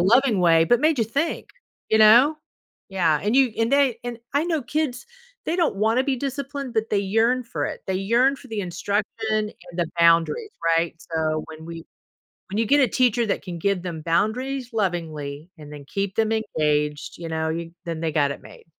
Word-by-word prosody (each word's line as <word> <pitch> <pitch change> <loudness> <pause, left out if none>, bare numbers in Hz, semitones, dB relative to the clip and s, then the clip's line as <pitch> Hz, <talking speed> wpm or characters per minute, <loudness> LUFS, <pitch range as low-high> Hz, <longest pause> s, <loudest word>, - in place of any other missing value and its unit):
loving 225 +2 +4
way, 165 -2 +5
but 240 +8 +3
made 310 -1 +3
you 225 - +3
think. 285 +9 -2 0.4
You 220 - +4
know? 240 +8 +7 0.5
Yeah, 170 -6 +1
and 215 +5 +1
you 265 -4 +4
and 225 +2 +1
they 270 -5 +3
and 240 -1 -5 0.2
I 295 +3 +2
know 320 -5 -1
kids, 295 - -2 0.4
they 340 - 0
don't 335 - +1
wanna 225 +5 +2
be 270 -2 0
disciplined, 275 0 -4
but 220 0 0
they 205 - +2
yearn 225 +6 +1
for 235 - -3
it. - - -7
They 190 - -1
yearn 240 +8 +2
for 265 - -15
the 220 -2 -3
instruction 200 +3 -1 0.3
and 215 -1 0 0.2
the 170 -2 -1
boundaries, 170 - +3 0.3
right? 165 0 0 0.2
So, 155 -1 0
when 160 0 -10
we 165 -1 -8 0.7
when 200 - -4
you 225 - +2
get 285 +6 +4
a 255 - +4
teacher 240 0 +2
that 200 - -1
can 175 -3 -6
give 195 0 0
them 170 -3 -5
boundaries 245 - -1
lovingly 165 -6 -3
and 150 -1 -11
then 145 -1 -10
keep 195 -1 -3
them 225 0 +1
engaged, 150 -9 -1
you 170 - -6
know, 160 0 -1
you 165 +1 -4
then 165 -2 -4
they 160 -1 -1
got 145 -2 +2
it - - -7
made. - - -15
210 Hz, 200 wpm, -23 LUFS, 165-250 Hz, 0.7 s, know